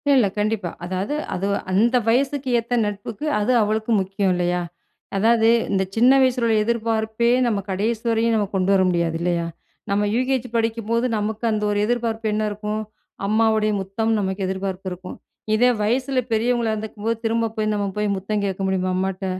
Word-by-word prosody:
இல்ல 230 -6 +4
கண்டிப்பா. 210 -4 -1 0.2
அதாவது, 190 +10 -2 0.2
அது 190 +2 -2 0.2
அந்த 230 +6 +3
வயசுக்கு 270 +3 +1
ஏத்த 235 +2 -2
நட்புக்கு 205 +7 -5
அது 220 +5 +1
அவளுக்கு 220 +2 0
முக்கியம் 195 0 0
இல்லையா? 175 0 0 0.6
அதாவது 225 +2 +4 0.2
இந்த 190 -1 +2
சின்ன 245 +3 +5
வயசில 250 -2 +2
உள்ள 220 - +3
எதிர்பார்ப்பே 225 0 0 0.2
நம்ம 215 -4 +1
கடைசி 215 +4 -1
வரையும் 230 0 +2
நம்ம 205 -2 +1
கொண்டு 190 +1 +2
வர 190 - +4
முடியாது 170 -2 0
இல்லையா? 170 -1 0 0.4
நம்ம 205 +1 +1
யூகேஜி 255 0 0
படிக்கும்போது 230 +1 0
நமக்கு 215 +2 -3
அந்த 210 -1 -1
ஒரு 205 - 0
எதிர்பார்ப்பு 230 -1 -1
என்ன 215 0 0
இருக்கும்? 210 +1 -3 0.5
அம்மாவுடைய 220 0 +2
முத்தம் 220 +4 -1
நமக்கு 190 0 -2
எதிர்பார்ப்பு 190 0 -4
இருக்கும். 180 +1 -8 0.4
இதே 245 +3 +4
வயசுல 255 +4 +1
பெரியவங்களா 230 0 +1
இருந்துருக்கும்போது 220 +1 -3
திரும்ப 225 0 0
போய் 215 0 0
நம்ம 205 -1 -1
போய் 210 -1 0
முத்தம் 205 +2 -2
கேட்க 195 -1 -3
முடியுமா? 185 -1 0
அம்மாட்ட. 190 +1 -2
215 Hz, 160 wpm, -22 LUFS, 195-230 Hz, 0.6 s, சின்ன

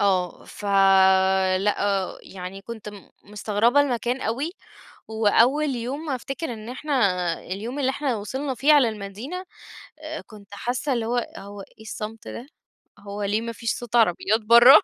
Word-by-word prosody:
آه، 185 -3 +1
فلأ 190 0 +3
يعني 190 +1 -8
كنت 220 -2 -8
م 205 -2 -11 0.2
مستغربة 210 +6 +2
المكان 250 -1 0
أوي، 265 +9 -2 0.6
وأول 230 +7 +3
يوم 280 +6 -4
أفتكر 270 +2 -4
إن 220 0 -8
إحنا 285 +4 -5 0.5
اليوم 220 +9 -5
اللي 265 -2 +2
إحنا 265 -3 -1
وصلنا 265 +6 -3
فيه 285 +4 +4
على 280 -6 +6
المدينة 220 - -6 0.6
آآ، 310 0 -6
كنت 210 -2 -15
حاسة 250 +6 -2
اللي 235 -2 -1
هو، 245 +2 0 0.2
هو 200 0 -9
إيه 220 - -15
الصمت 220 +1 -7
ده؟ 245 - -7 0.5
هو 200 +1 -6
ليه 205 +2 0
ما 230 - -4
فيش 230 0 -2
صوت 240 -1 -6
عربيات 220 0 +3
برّا؟ 235 +5 +9
225 Hz, 145 wpm, -24 LUFS, 200-255 Hz, 0.6 s, برّا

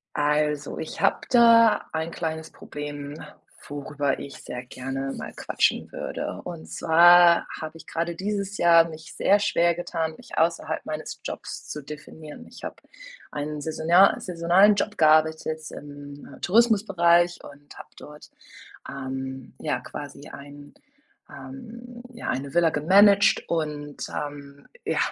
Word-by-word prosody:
Also, 150 0 0
ich 160 - -6
habe - - +2
da 230 -2 +6
ein 160 +1 -3
kleines 160 -1 -5
Problem, 145 -1 -8 0.5
worüber 145 0 -2
ich 140 -1 -8
sehr 125 0 -7
gerne 135 +2 -5
mal - - -7
quatschen - - 0
würde. - - -5
Und 80 - -8
zwar 170 - +6
habe 155 +1 -7
ich 165 - -14
grade 170 +1 -3
dieses 200 +1 -3
Jahr 170 -1 +5
mich 160 0 -11
sehr 200 - +4
schwer 170 -4 +2
getan, 165 -2 -3
mich - - -12
außerhalb 165 -1 0
meines 155 0 -6
Jobs - - -7
zu 150 - -6
definieren. 150 +1 -11
Ich - - -13
habe - - -6 0.5
einen 150 0 -5
saisonal 165 +5 +3
saisonalen 180 +4 +4
Job 210 +1 -2
gearbeitet, 155 0 +3
im, 145 0 -11
äh, - - -19
Tourismusbereich 185 -5 +3
und 145 0 -14
habe - - -11
dort, 150 0 -13 0.6
ähm, 130 -1 -6
ja, - - -2
quasi - - -9
ein, 145 +1 -12 0.6
ähm 230 - -11
ja, 235 - -7
eine 135 +2 -4
Villa 170 -1 +4
gemanagt. 200 +7 +5
Und, 150 -3 -3
ähm, 145 -1 -7 0.2
ja, - - 0
160 Hz, 135 wpm, -25 LUFS, 145-175 Hz, 0.6 s, da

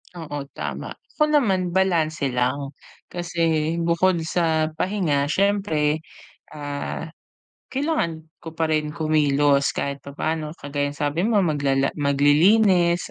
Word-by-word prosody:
Oo, 145 -4 -5
tama. - - -5 0.2
Ako 300 - +3
naman 190 -11 +2
balanse 165 -6 +1
lang, 135 +3 -1 0.3
kasi 165 -2 -1
bukod 170 +2 +2
sa 160 -2 +1
pahinga 175 -7 0
siyempre, 160 -6 +1 0.4
ah, 145 +2 -5 0.6
kailangan 170 - -2
ko 165 -1 -10
pa 160 -1 -1
rin 150 -1 0
kumilos 145 -3 +2
kahit 140 0 -3
papaano 155 +2 -4
kagaya 145 -2 -3
ng - - -16
sabi 150 +6 0
mo 215 -3 +3
maglala 140 -4 +1
maglilinis 170 +6 +3
160 Hz, 115 wpm, -23 LUFS, 145-175 Hz, 0.6 s, Ako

